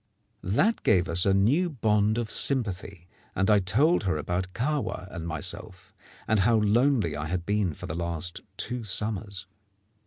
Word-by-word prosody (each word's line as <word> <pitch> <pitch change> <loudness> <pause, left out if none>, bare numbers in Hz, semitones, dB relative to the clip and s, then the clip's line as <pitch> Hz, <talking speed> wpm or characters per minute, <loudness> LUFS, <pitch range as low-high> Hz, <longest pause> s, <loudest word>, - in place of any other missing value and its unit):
That 195 - +1
gave 95 -4 +2
us 90 +2 +3
a 95 - +4
new 140 - +2
bond 110 -5 +1
of 115 -2 -3
sympathy; 100 -8 -1 0.3
and 95 +3 +2
I 105 - +5
told 115 - +2
her 90 -5 0
about 90 +4 -3
Kahwa 135 -7 -2
and 85 -2 -6
myself, 85 +2 -5 0.3
and 110 -1 +2
how 115 +4 +3
lonely 110 - +2
I 75 +2 -4
had 90 +1 -3
been 100 -5 0
for - - -9
the - - -5
last 85 0 -4 0.2
two 125 +1 -3
summers. 100 -2 -1
100 Hz, 160 wpm, -27 LUFS, 90-115 Hz, 0.3 s, I